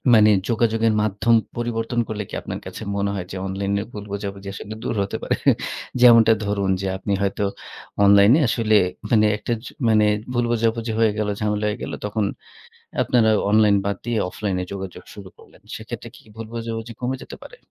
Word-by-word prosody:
মানে 110 -1 +6 0.2
যোগাযোগের 115 -1 +2
মাধ্যম 110 +3 +2 0.2
পরিবর্তন 120 0 -2
করলে 105 -1 -4
কি - - -14
আপনার - - -6
কাছে - - -8
মনে 100 0 0
হয় 95 -3 -4
যে 95 - -5
অনলাইনে 100 +1 -1
ভুল 105 -3 -7
বোঝাবুঝি 100 -1 -5
আসলে 105 +2 -7
দূর - - -2
হতে 100 - -4
পারে? - - +1 0.7
যেমনটা 115 -2 +8
ধরুন 100 -1 -1
যে, 95 - -2
আপনি 100 +1 -2
হয়তো 100 +1 -1 0.6
অনলাইনে 100 +7 +6
আসলে 110 -1 +2 0.4
মানে 110 -2 +5
একটা 115 +3 -2
ছু - - -8 0.2
মানে 110 -1 +4 0.3
ভুল 120 0 +1
বোঝাবুঝি 115 0 0
হয়ে 110 -2 +4
গেল, 105 - -1
ঝামেলা 105 0 -1
হয়ে 105 - -2
গেল। - - -5
তখন 105 0 -1 0.8
আপনারা 115 -3 +3 0.2
অনলাইন 105 -1 +5
বাদ 100 -1 -1
দিয়ে 120 -2 -1
অফলাইন 100 0 -3
এ - - -3
যোগাযোগ 95 -2 -7
শুরু 100 -2 -10
করলেন। - - -19
সেক্ষেত্রে - - -8
কি - - -17
ভুল 115 -1 -6
বুঝা 115 -1 -4
বুঝি 115 +1 -7
কমে 125 +1 -1
যেতে - - -9
পারে? - - -12
110 Hz, 185 wpm, -22 LUFS, 100-115 Hz, 0.8 s, যেমনটা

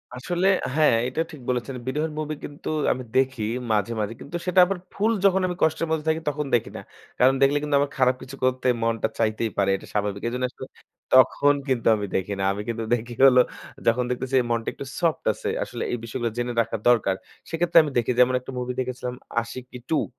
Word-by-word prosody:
আসলে 175 +9 -1 0.3
হ্যাঁ, 155 -6 +5
এইটা 130 +6 -1
ঠিক 150 -5 -11
বলেছেন। 125 +1 -2
বিরহর 150 +4 -1
মুভি 155 0 -3
কিন্তু 145 - -7 0.2
আমি 130 - -2
দেখি 130 -3 +1 0.3
মাঝে, 105 +1 +1
মাঝে। 105 +1 -2
কিন্তু 155 - -8
সেটা 180 0 +3
আবার 195 +1 -2 0.2
full 215 +3 +1
যখন 190 -1 +4
আমি 180 - -3
কষ্টের 160 +1 +1
মধ্যে 160 -1 -1
থাকি, 160 +1 0
তখন 150 +1 -3
দেখি 115 - 0
না। - - -7 0.4
কারণ 130 +2 +6
দেখলে 140 +1 +4
কিন্তু 150 -1 0
আমার 140 0 0
খারাপ 130 -1 +3
কিছু 130 +1 -9
করতে 130 0 +1 0.2
মনটা 115 -1 +1
চাইতেই 110 0 0
পারে। 100 -1 +2
এটা - - -9
স্বাভাবিক। 100 -1 -1
এইজন্য 125 +2 -1
আসলে 130 - -9 0.5
তখন 130 +2 +6
কিন্তু 130 -4 0
আমি 105 -1 -3
দেখি 95 +2 -1
না। - - 0
আমি 100 - -5
কিন্তু 115 -1 -3
দেখি 120 +1 -6
হলো 125 -2 +7 0.5
যখন 115 +2 +3
দেখতেছি 130 +1 -2 0.2
মনটা 115 -1 -1
একটু 140 - -8
soft 165 -3 0
আছে, - - -7 0.2
আসলে - - -5
এই 120 - -1
বিষয়গুলো 115 +1 -2
জেনে 120 0 -1
রাখা 115 0 -3
দরকার, 110 -5 +3 0.3
সেক্ষেত্রে 170 +1 +1
আমি 150 - -4
দেখি 120 +1 +1
যেমন 125 0 +5
একটা 125 - -9
মুভি 125 0 -3
দেখেছিলাম 125 -1 -3 0.3
'Ashiqui 125 +2 -9
2'। 160 - +2
130 Hz, 200 wpm, -24 LUFS, 115-150 Hz, 0.5 s, হলো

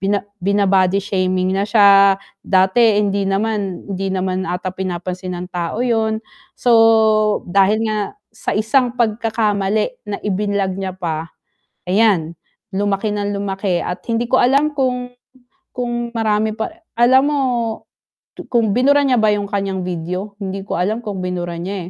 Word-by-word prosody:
Bina 200 +1 0 0.2
bina-body 195 -1 +2
shaming 185 -1 0
na 195 +2 -1
siya, 200 -2 +6 0.2
dati 200 +4 +3
hindi 200 -1 +1
naman 200 -2 -2
hindi 195 +1 -2
naman 190 -1 -2
ata 180 +1 -3
pinapansin 185 0 -4
ng 180 +1 -8
tao 175 +7 -2
yun. 220 -2 0 0.3
So 220 -2 +4
dahil 200 +4 +2
nga 215 -1 -1 0.3
sa 200 - -3
isang 245 +3 +1
pagkakamali 220 - 0
na 205 - -2
i-vinlog 200 -1 -1
niya 190 -1 -4
pa, 165 -3 -4 0.6
ayan, 185 -5 +2 0.3
lumaki 200 +2 -1
ng 205 0 -2
lumaki 195 -3 -2
at 180 - -5
hindi 235 +1 -1
ko - - +4
alam 275 +4 +3
kung 250 -2 -1 0.7
kung 240 -1 -3
marami 215 -1 0
pa 220 +6 -3 0.2
alam 255 +3 +5
mo, 295 -1 0 1.1
kung 230 -4 +2
binura 285 +3 +4
niya 255 -2 +3
ba 215 - +4
yung 205 -1 -1
kanyang 195 -2 -2
video? 180 +3 -4
Hindi 195 0 -4
ko - - -3
alam 210 +7 -1
kung 205 -2 -4
binura 175 -1 -3
niya 185 -1 -5
200 Hz, 145 wpm, -18 LUFS, 185-225 Hz, 1.1 s, siya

